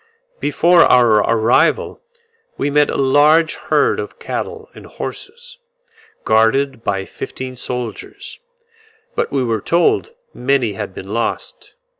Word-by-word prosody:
Before 175 0 +3
our 120 -7 +5
arrival 115 +2 +1 0.6
we 145 - -1
met 150 0 +3
a - - -2
large 150 +4 +4
herd - - 0
of - - -7
cattle 445 -1 -6
and - - -13
horses, - - -9 0.6
guarded 115 +3 +1
by 95 -1 -2
fifteen 130 +5 -7
soldiers; 125 -2 -6 0.7
but - - -2
we 135 -2 0
were 115 -3 -1
told 175 - +1 0.2
many 125 -4 0
had 100 -2 -6
been 95 +2 -8
lost. 115 +1 -4
130 Hz, 120 wpm, -18 LUFS, 115-150 Hz, 0.7 s, our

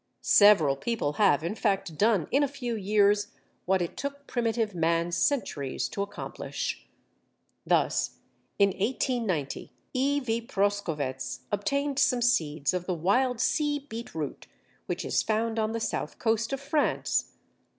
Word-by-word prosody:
Several 190 -10 +6
people 150 -1 -2
have, 155 -7 +4
in 170 - -1
fact, 195 -6 -1
done 205 -3 +2
in 275 - +3
a 285 - +3
few 250 -4 -4
years 205 0 +3 0.4
what 190 0 +2
it 170 - -5
took 280 0 -5
primitive 230 -3 -1
man 170 0 +1
centuries 170 - 0
to 200 - -4
accomplish. 200 0 -5 0.8
Thus, - - +1 0.4
in 200 -1 +5
1890, 205 - -2 0.2
E. 280 +3 +2
v. 230 -3 -1
Proskowetz 165 - -2
obtained 280 +7 0
some 245 -2 +3
seeds 155 - +1
of 180 -1 -3
the 180 - 0
wild 245 +9 +1
Sea 295 +3 +1
beetroot 230 - -6 0.4
which - - -3
is - - +1
found 225 +1 0
on 215 0 0
the 230 - -2
south - - -3
coast 225 +1 0
of 275 - -2
France. 290 +2 0
210 Hz, 140 wpm, -28 LUFS, 175-245 Hz, 0.8 s, Several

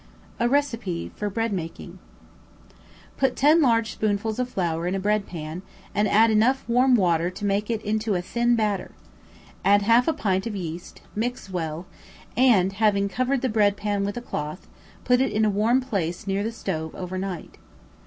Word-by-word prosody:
A 235 +1 +2
Receipt 230 -11 -1
for 210 - -3
Bread 225 +1 -1
Making. 165 -3 -6 1.2
Put 265 -2 +1
ten 305 +4 +5
large 230 -5 +2
spoonfuls 215 +1 -1
of 250 0 -1
flour 170 -5 -1
in 185 - -1
a - - -1
breadpan, 185 -5 -2 0.3
and 210 +1 +2
add 220 +3 +5
enough 235 +5 +2
warm 250 +2 +4
water 175 -5 +2
to 185 +3 -6
make 200 +2 0
it 225 -2 -2
into 215 0 0
a 175 - 0
thin 240 +5 +1
batter, 210 -4 -1 0.7
add 205 +1 +4
half 230 +4 +4
a 325 - +3
pint 195 -8 -1
of 220 - -4
yeast, 170 -2 -7
mix 235 -2 -3
well, 165 -1 -3 0.5
and, 215 -7 +4
having 200 -1 +2
covered 255 +5 0
the - - +2
bread 210 -3 +2
pan 205 -1 -1
with 205 +3 -3
a - - -3
cloth, 150 -6 -5 0.4
put 250 0 +3
it 265 - +1
in 215 +1 +2
a 210 - +2
warm 225 +6 +2
place 195 -6 -3
near 195 0 -1
the 220 +2 -2
stove 160 -8 -4
over 185 0 -5
night. 190 -3 -6
210 Hz, 180 wpm, -24 LUFS, 185-235 Hz, 1.2 s, ten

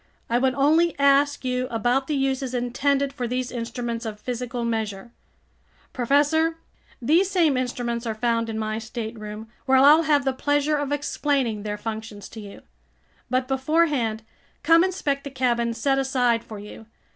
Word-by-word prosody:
I 240 - +3
would 260 0 +1
only 315 +5 +3
ask 280 0 +3
you 255 0 -1
about 245 +4 0
the 300 - -1
uses 270 -1 -1
intended 275 +3 0
for 250 -3 -3
these 250 +1 -2
instruments 235 0 -4
of 215 -2 -6
physical 245 0 -4
measure—" 220 -2 -3 0.8
"Professor, 295 +6 +2 0.4
these 330 +10 +3
same 335 -7 +3
instruments 240 -2 -2
are 220 - -2
found 230 0 0
in 220 - -4
my 215 0 -2
stateroom, 220 -1 -7 0.2
where 265 0 +5
I'll 290 +4 +7
have 295 -4 +2
the 265 - +1
pleasure 290 +3 +1
of 290 -1 -3
explaining 280 -6 -1
their 210 0 -4
functions 215 -2 -6
to 225 - -10
you. 200 -2 -10 0.7
But 255 +1 0
beforehand, 265 -5 +1 0.4
come 330 +3 +6
inspect 300 -7 -1
the 280 - -6
cabin 240 -3 0
set 270 +3 +1
aside 250 -4 +1
for 215 - -9
you. 210 +2 -11
255 Hz, 155 wpm, -24 LUFS, 230-280 Hz, 0.8 s, I'll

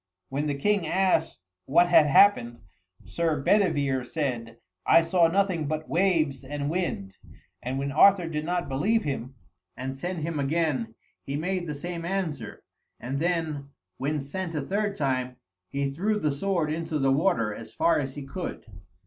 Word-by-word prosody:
When 145 +3 -2
the 145 - -1
king 200 +2 +1
asked 180 - +1 0.3
what 175 +6 +5
had 160 -3 +6
happened, 135 -8 +4 0.4
Sir 155 - -1
Bedivere 145 -7 +2
said, 120 -5 -3 0.3
"I 165 - +5
saw 165 0 +4
nothing 180 -3 +1
but 155 +1 -3
waves 160 -7 +1
and 145 +2 -3
wind," 160 - -3 0.5
and 130 +2 -3
when 140 +1 -2
Arthur 180 +4 +5
did 150 -2 -3
not 175 +1 -1
believe 200 +13 +1
him, 135 -3 -4 0.4
and 130 +1 -4
sent 170 +4 -4
him 160 -2 -2
again, 140 -6 0 0.3
he 135 - -5
made 180 +3 -2
the 150 - -3
same 170 +3 -5
answer, 175 -4 -3 0.4
and 135 +3 -3
then, 160 -4 -1 0.3
when 145 +3 -1
sent 165 +5 -5
a 150 - 0
third 205 +5 -1
time, 130 -4 -1 0.3
he 140 0 -1
threw 205 +9 0
the 155 -8 0
sword 165 +1 -1
into 160 0 -2
the 135 -2 +2
water, 135 - +2
as 115 - -10
far 170 - +2
as 135 -2 -4
he 145 - -6
could. 175 +6 -6
155 Hz, 165 wpm, -27 LUFS, 135-175 Hz, 0.5 s, had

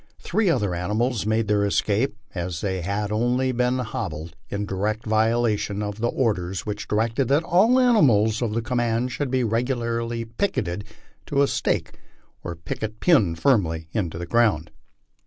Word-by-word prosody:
Three 215 -4 0
other 105 - +1
animals 105 +5 -1
made 110 0 +1
their 105 -1 +2
escape, 105 +4 +1 0.2
as 85 -2 -4
they 95 -2 -2
had 100 +3 -2
only 120 +4 +1
been 125 +1 +1
hobbled, 85 -9 -4
in 100 0 -2
direct 105 +3 -2
violation 110 -2 +1
of 105 +1 -5
the 120 - +2
orders 95 -9 -1
which 105 0 -4
directed 115 +4 0
that 145 +5 +3
all 195 +9 +4
the 260 - +5
animals 115 - +4
of 110 -3 -1
the 115 - -1
command 120 0 0
should 145 0 -2
be 130 0 +1
regularly 115 0 -1
picketed 115 - -2 0.4
to 140 0 +2
a - - +3
stake - - -1 0.4
or 85 - -5
picket 105 +6 -5
pin, 110 - +4
firmly 80 - +1
driven 105 - 0
into 80 -1 -7
the 85 - -4
ground. 95 -6 +2
110 Hz, 165 wpm, -24 LUFS, 100-125 Hz, 0.4 s, the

